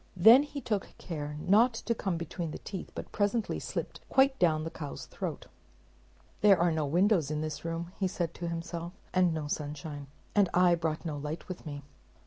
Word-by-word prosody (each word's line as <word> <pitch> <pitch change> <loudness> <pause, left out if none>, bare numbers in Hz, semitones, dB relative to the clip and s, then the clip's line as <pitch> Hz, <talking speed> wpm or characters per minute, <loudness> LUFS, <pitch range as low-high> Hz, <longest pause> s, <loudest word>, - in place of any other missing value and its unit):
Then 225 +9 +9
he 290 -1 -5
took 210 -6 -3
care 150 -4 -5
not 225 +9 +4
to 230 - -1
come 190 -6 -2
between 170 0 -4
the - - -5
teeth, 190 -3 -7
but - - -6
presently 205 +2 0
slipped - - -4
quite 265 0 +4
down 155 -3 +3
the 165 - -4
cow's 150 -4 -6
throat. - - -5 0.9
"There 200 -3 +6
are 170 0 +3
no 155 -2 0
windows 175 0 +3
in 155 0 -1
this 155 -2 -4
room," 165 +1 -4 0.2
said 175 -2 -2
he - - -17
to 170 - -2
himself, 170 +1 -4 0.2
"and 185 -2 +4
no 160 -2 -2
sunshine, 145 -1 -4 0.3
and 200 -3 +4
I 180 -1 +6
brought 160 -1 -1
no 155 -3 -3
light 150 +3 -5
with 180 -3 -7
me." 145 -1 -6
170 Hz, 190 wpm, -30 LUFS, 155-195 Hz, 0.9 s, Then